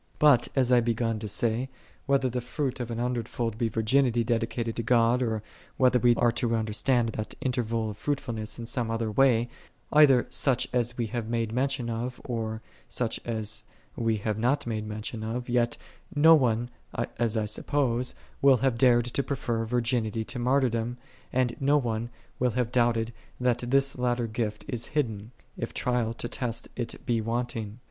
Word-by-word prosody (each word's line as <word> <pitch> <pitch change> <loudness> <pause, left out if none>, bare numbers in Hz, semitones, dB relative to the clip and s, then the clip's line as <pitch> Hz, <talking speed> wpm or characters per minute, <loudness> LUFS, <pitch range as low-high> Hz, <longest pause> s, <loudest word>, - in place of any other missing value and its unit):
15ut, 140 -5 +5
as 130 -2 +3
1 125 - +7
had 120 - +2
be^un 115 -1 -1
to 105 - -5
say, 115 +5 0 0.4
whether 135 -1 +3
the 125 0 -2
fruit 130 +1 -3
an 120 -2 -3
hundred 120 -1 -1
fold 115 -3 -2
be 115 -2 +1
virginity 120 +2 +2
dedi 115 -1 +1
cated 115 -1 -3
to 115 - -3
(iod. 115 +1 +3
or 110 -3 -1 0.3
whether 125 -1 +4
we 120 0 +4
are 120 0 +3
to 115 0 0
under 110 -1 -2
stand 120 0 +2
that 110 -1 -5
interval 115 -4 -1
of 100 - -10
fruitfulness 115 -7 -3
in 115 - -6
some 120 -1 -2
other 115 -1 -1
way, 120 -1 +4 0.5
either 140 -5 +6
such 135 -4 +2
as 120 -1 0
we 120 - 0
have 110 0 -4
made 115 -2 -1
men 130 +4 +1
tion 135 -3 -2
of, 120 +2 -3
or 110 -2 -3 0.3
such 120 -3 -1
as 110 -2 -2 0.3
we 115 -2 0
have 105 +1 -2
not 130 +5 +1
made 110 -2 -3
mention 110 +1 -5
of; 120 +3 -3
yet 120 -1 +1 0.4
no 160 +3 +8
one, 120 -5 +2 0.5
as 115 -1 +1
I 110 - +1
suppose, 125 +2 0 0.3
will 135 -2 +6
have 125 -1 0
dared 120 -2 +5
to 120 +3 -1
prefer 120 -5 -2
virginity 115 -1 0
to 125 +3 -6
martyrdom, 120 -2 +1 0.3
and 125 -2 +1
no 140 +1 +4
one 115 -3 -1 0.3
will 125 - +3
have 120 -2 0
doubted 120 -2 +2 0.3
that 125 -1 +2
this 135 +3 +1
latter 120 -1 +1
gift 110 -1 -3
is 120 -1 -3
hid 150 -2 +1
den, 105 +1 -9 0.3
if - - -4
trial 120 -2 0
to 120 - -4
test 120 -2 -3
it 120 0 -5
be 120 -4 +1
wanting. 115 -2 -3
120 Hz, 185 wpm, -28 LUFS, 115-125 Hz, 0.5 s, no